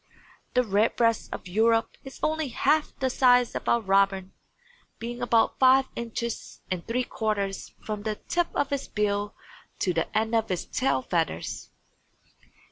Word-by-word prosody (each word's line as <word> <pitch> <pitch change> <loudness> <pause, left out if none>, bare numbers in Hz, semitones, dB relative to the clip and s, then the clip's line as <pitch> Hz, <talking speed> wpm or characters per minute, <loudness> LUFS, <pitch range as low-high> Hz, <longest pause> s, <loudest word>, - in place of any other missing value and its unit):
The 250 - +5
Redbreast 225 +2 +1
of - - -6
Europe 225 +4 +2
is 270 - -10
only 315 -1 0
half 295 +4 +1
the 265 - 0
size 250 -1 +4
of - - -3
our 235 - +3
robin, 195 -1 +2 0.6
being 240 +2 -6
about 235 -2 +2
five 265 0 +5
inches 235 0 -5
and 180 -2 -2
three 245 +2 0
quarters 205 -5 -3
from 210 -1 -3
the 215 0 -2
tip 345 +9 -1
of 285 - 0
its 280 -1 -2
bill 205 -1 -1 0.4
to 180 - 0
the 165 -1 -1
end 220 +1 0
of 225 -1 +1
its 180 -2 -2
tail 255 - 0
feathers. 165 - -2
225 Hz, 150 wpm, -27 LUFS, 200-250 Hz, 0.6 s, The